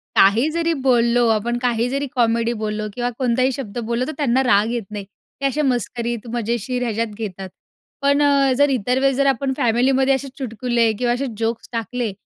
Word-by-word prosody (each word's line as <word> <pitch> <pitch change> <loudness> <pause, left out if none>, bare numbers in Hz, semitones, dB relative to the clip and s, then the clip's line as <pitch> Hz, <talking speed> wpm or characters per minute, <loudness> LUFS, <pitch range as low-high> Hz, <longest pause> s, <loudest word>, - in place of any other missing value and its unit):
काही 225 +10 +5
जरी 335 0 0
बोललो 240 -3 +2
आपण, 230 +2 0
काही 240 -1 +1
जरी 275 +1 -2
कॉमेडी 235 0 +2
बोललो 215 0 -2
किंवा 245 +1 -2
कोणताही 255 +1 +2
शब्द 245 -4 -6
बोललो, 235 +2 -1
तर - - -3
त्यांना 265 -2 +2
राग 215 -1 +3
येत 240 -3 -2
नाही. 205 -2 -5 0.4
ते - - -1
असे 280 +3 +1
मस्करीत, 240 -3 -2
मजेशीर 240 +2 -2
ह्याच्यात 230 0 -1
घेतात. 195 -3 -6 0.5
पण 280 +1 +3
अ, 280 -2 +4
जर 285 0 +4
इतर 250 0 0
वेळेस 270 -1 +2
जर 275 - +2
आपण 270 0 +1
फॅमिलीमध्ये 260 +3 +2
असे 270 +1 -5
चुटकुले 235 -2 0
किंवा 240 -1 +1
असे 270 +3 -2
जोक्स 230 0 -3
टाकले, 230 0 -3
240 Hz, 180 wpm, -21 LUFS, 230-265 Hz, 0.5 s, काही